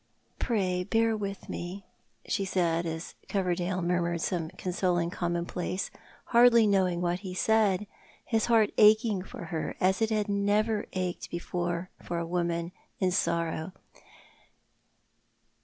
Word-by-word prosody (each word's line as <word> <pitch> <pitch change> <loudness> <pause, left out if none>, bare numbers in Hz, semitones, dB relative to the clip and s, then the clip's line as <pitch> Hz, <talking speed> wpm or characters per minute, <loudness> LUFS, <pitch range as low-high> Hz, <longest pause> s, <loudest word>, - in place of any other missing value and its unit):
"Pray, 185 -6 0
bear 225 +2 +2
witli 200 -2 -5
me," 180 +3 -6 0.4
she 195 - 0
said, 170 -3 0
as 160 +1 -5 0.2
Coverdale 185 -2 0
murmnred 170 -1 0
some 165 -2 -1
consoling 175 -1 -1
commonplace, 175 +1 -2 0.4
hardly 235 -1 +7
knowing 185 -4 +2
what 175 0 0
ho 185 -2 -6
said, 210 0 +2 0.4
his 225 -2 +1
heart 225 -3 +3
jiching 215 -2 +5
for 175 - -9
her 160 - -2
as 190 +2 +2
it 220 - +3
had 215 -2 0
never 205 +2 +1
ached 185 -1 -3
before 175 +1 -3
for 175 - -4
a 170 - -2
woman 170 0 -1 0.3
in 185 -1 +2
sorrow. 170 -1 -1
185 Hz, 125 wpm, -29 LUFS, 175-205 Hz, 0.4 s, hardly